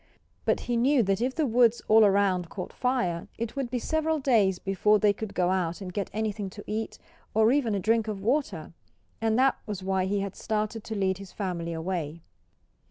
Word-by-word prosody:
But - - +1
he 240 -1 -1
knew 255 +1 +4
that 195 +1 0
if 255 +2 0
the 315 - +1
woods 240 -1 +3
all 220 +1 +7
around 195 -4 +2
caught 185 - -6
fire 245 -10 -1
it 230 +2 -4
would 270 -3 -2
be 250 - -2
several 315 +5 0
days 225 -10 +3
before 195 +3 +2
they 205 0 +3
could 220 -1 -7
go 180 0 +2
out 175 -3 -1
and 185 -3 -7
get 200 0 -2
anything 210 -1 -2
to 205 - -7
eat, 220 +1 -4 0.4
or 220 +1 +5
even 250 -6 +1
a - - 0
drink 225 +3 +1
of 210 -2 -3
water. 220 - -1 0.5
And 225 0 +2
that 265 +1 +3
was 200 -3 -5
why 190 -1 0
he 200 +1 0
had 195 -1 -4
started 215 0 -2
to 220 - -4
lead 190 -2 0
his 195 -2 -10
family 175 -4 -3
away. 165 -1 -3
210 Hz, 205 wpm, -27 LUFS, 190-230 Hz, 0.5 s, all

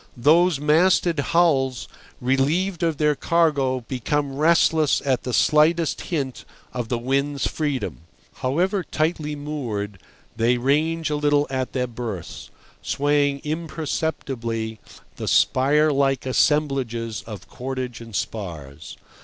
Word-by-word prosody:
Those 160 +5 +4
masted 165 +2 +3
hulls, 140 -5 +2 0.3
relieved 150 +9 +1
of 165 -3 0
their 150 0 +3
cargo, 140 -6 +1
become 135 +3 -2
restless 155 0 +3
at 130 -3 +1
the 125 - -4
slightest 155 +5 +3
hint 140 -8 -3 0.3
of 120 -2 -4
the 120 - 0
wind's 140 +3 -1
freedom. 145 -4 -2 0.4
However 180 +9 0
tightly 155 -2 -1
moored, 120 -10 -4 0.4
they 115 +2 +2
range 155 +5 +1
a - - +1
little 145 0 +2
at 130 -1 -2
their 125 -1 0
berths, 115 -7 -7 0.3
swaying 145 -1 +1
imperceptibly 140 -8 -3 0.4
the - - -5
spire 150 +4 +3
like 135 -1 +1
assemblages 130 -5 0
of 105 -5 -8
cordage 130 -2 -5
and 115 -3 -9
spars. 80 -10 -6
140 Hz, 115 wpm, -23 LUFS, 125-155 Hz, 0.4 s, Those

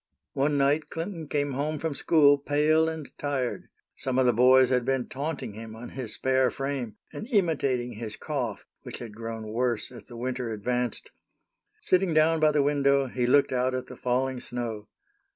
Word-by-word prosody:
One 145 +2 +1
night 140 +3 +2
Clinton 165 -1 -5
came 145 -1 -1
home 150 +4 -1
from 160 0 -2
school 145 -1 +5
pale 155 +3 +2
and 160 -3 -7
tired. 140 -4 -2 0.3
Some 130 -1 -2
of 130 - +4
the 125 - +4
boys 130 +2 +6
had 125 -1 +2
been 130 -1 0
taunting 140 -4 -4
him 110 +1 -9
on 120 +2 -8
his 125 -5 -6
spare 130 -1 +2
frame, 135 -5 -4 0.2
and 215 - -6
imitating 145 - +1
his 110 -1 -4
cough, - - -4 0.2
which - - -8
had 115 -3 -8
grown 115 -1 -6
worse 120 0 -1
as 120 - -12
the 120 - -10
winter 125 0 -3
advanced. 120 +2 -2 0.7
Sitting 185 -3 +2
down 160 +1 +4
by 155 0 +5
the 150 -1 +2
window, 140 -1 +3
he 125 -1 -1
looked 140 +3 +4
out 130 0 +1
at 130 - -3
the - - -10
falling 130 +1 -1
snow. 115 -4 -5
130 Hz, 180 wpm, -27 LUFS, 120-145 Hz, 0.7 s, boys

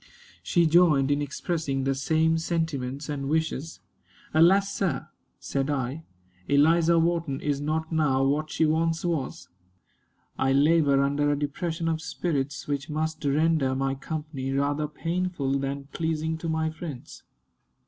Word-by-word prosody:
She 170 -1 +2
joined 155 -4 +4
in 145 0 +1
expressing 145 -1 -2
the 135 0 +1
same 160 +4 +1
sentiments 150 -5 -2
and 140 -2 -3
wishes. 160 0 -2 0.5
"Alas! 195 +5 +4
sir," 175 -9 -2 0.3
said 135 0 -2
I, 135 +1 -2 0.5
"Eliza 165 +4 +4
Wharton 165 -4 0
is 145 -1 -1
not 155 +2 -2
now 145 -5 +2
what 150 +3 0
she 160 - +1
once 165 +2 +1
was. 160 -6 -3 0.9
I 135 0 +2
labor 145 -1 +4
under 145 +1 +1
a 145 - 0
depression 160 +3 -3
of 160 -1 -1
spirits 145 -3 -3
which 145 +1 -3
must 155 +1 -2
render 145 -1 +2
my 135 0 0
company 140 -1 -5
rather 145 +2 0
painful 165 -4 -2
than 140 +1 -3
pleasing 160 -1 -1
to 165 - -4
my 160 0 0
friends." 155 -5 -8
155 Hz, 140 wpm, -26 LUFS, 140-165 Hz, 0.9 s, joined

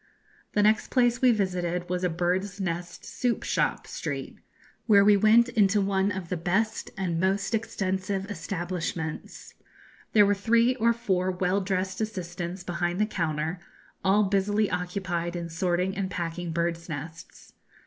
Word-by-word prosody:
The 205 - +3
next 215 +1 +3
place 245 -1 +2
we 255 - +6
visited 180 -4 -1
was 180 0 -2
a 180 - +2
bird's 180 +4 -1
nest 175 -2 -4
soup 245 -2 -1
shop - - 0
street, - - -5 0.5
where 200 -3 +6
we 210 0 +7
went 220 +4 +5
into 210 -4 +3
one 195 0 +1
of 185 -4 -5
the 180 - -1
best 205 +7 -1
and 175 -4 -1
most 195 +4 0
extensive 195 -3 -1
establishments. 175 -4 -5 0.6
There 210 -2 +7
were 200 - +3
three 230 +4 +3
or 230 0 +3
four 190 -6 0
well 185 +2 0
dressed 190 +1 -2
assistants 180 -3 -4
behind 175 0 -2
the 215 - +4
counter, 160 -3 -2 0.4
all 195 +2 +4
busily 200 +1 +1
occupied 180 -1 -2
in 170 -1 -4
sorting 180 +3 0
and 195 -1 -2
packing 170 -1 -4
birds' 170 +1 -2
nests. 160 +3 -8
190 Hz, 150 wpm, -27 LUFS, 175-205 Hz, 0.6 s, we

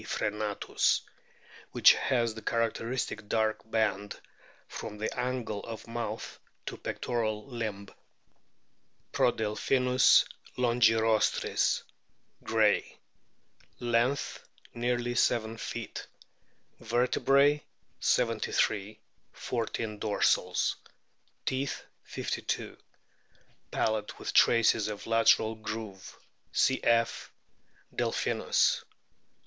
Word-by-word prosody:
frccnatus, 105 -1 0 0.7
which - - +8
has 120 -3 0
the 115 - -9
characteristic 115 -1 -2
dark 110 0 0
band 105 -3 -1 0.5
from 105 - -7
the 110 - -3
angle 125 -4 -2
of 115 -1 -8
mouth 115 0 -5 0.3
to - - -5
pectoral 110 -3 -3
limb. 110 -5 -4 1.3
Prodelphinus 125 +4 +3 0.3
longirostris, 115 -3 +2 0.6
Gray/ - - +3
x - - -18 0.4
' - - -34
Length, 125 +4 +1 0.3
nearly 120 0 -1
7 115 -2 +1
feet. - - -6 0.7
Vertebrae, 135 +5 +3 0.4
73; 105 +1 +1 0.4
14 115 -2 -3
dorsals. 105 -1 +1 0.7
Teeth, 135 +1 -2 0.2
52. - - -3 0.9
Palate 110 -1 -1
with - - -5
traces 115 -2 +4
of 105 -1 -6
lateral 115 -1 +4
groove 110 -3 -7 0.3
(cf. 115 0 +2 0.7
Delphinus). - - +1
115 Hz, 75 wpm, -29 LUFS, 110-120 Hz, 1.3 s, which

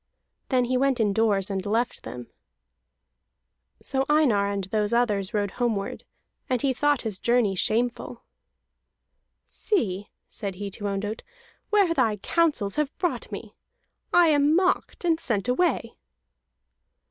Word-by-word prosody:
Then 255 -2 +2
he 255 +1 0
went 270 -1 +1
indoors 205 -2 +1
and 190 -1 -2
left 225 +4 -1
them. 125 -1 -8 1.6
So 265 0 0
Einar 245 -10 +3
and 200 -1 -2
those 210 +3 -1
others 210 -5 +1
rode 205 -3 -1
homeward, 215 -5 -1 0.4
and 255 -1 +1
he 265 +2 +1
thought 290 +1 +1
his 210 -5 -3
journey 235 -4 +2
shameful. 235 +4 -1 1.2
"See," 205 - -2 0.2
said 195 -2 -5
he 200 +1 -5
to 205 - -7
Ondott, 205 +2 -3 0.5
"where 400 -5 +3
thy 220 -9 +1
counsels 290 - 0
have 300 -2 -1
brought 355 - -2
me. - - -7 0.6
I 345 -2 +5
am 295 +1 +4
mocked 365 0 0
and 325 -2 +2
sent 230 -8 -1
away." 250 -3 +1
235 Hz, 130 wpm, -25 LUFS, 205-285 Hz, 1.6 s, I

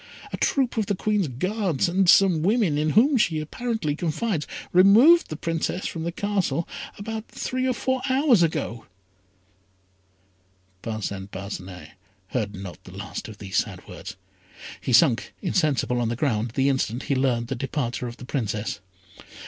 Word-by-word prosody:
A - - -2
troop 265 -4 +1
of 215 -3 0
the 200 - 0
Queen's 205 -2 0
Guards, 185 - -1
and 185 +1 +2
some 185 -5 +6
women, 200 -3 +2
in 150 +1 +1
whom 270 +4 +5
she 165 -8 +2
apparently 165 -1 -2
confides, 165 +1 -2 0.3
removed 220 - +7
the 155 - -4
Princess 165 +3 -2
from 165 -1 -4
the 170 - -1
Castle 185 -5 -1 0.3
about 220 +2 -5
three 255 0 -2
or 255 - +2
four 260 +1 -1
hours 260 - +4
ago." 155 -8 -1 1.9
Parcin 100 -3 -4
Parcinet 95 -4 -8 0.4
heard 105 -5 -2
not 95 -1 -9
the 95 0 -12
last 100 0 -6
of 110 -2 -10
these 100 -2 -4
sad - - -2
words. - - -8 0.7
He - - -5
had - - +7
sunk - - +3
insensible 130 -5 +1
on 115 - 0
the 120 - -1
ground 115 -4 -1
the 135 0 +2
instant 130 -2 0
he - - -1
learned 130 -3 +1
the 135 - -1
departure 125 -1 -3
of 120 - -8
the 125 - -10
Princess. 110 -5 -2
155 Hz, 160 wpm, -25 LUFS, -, 1.9 s, removed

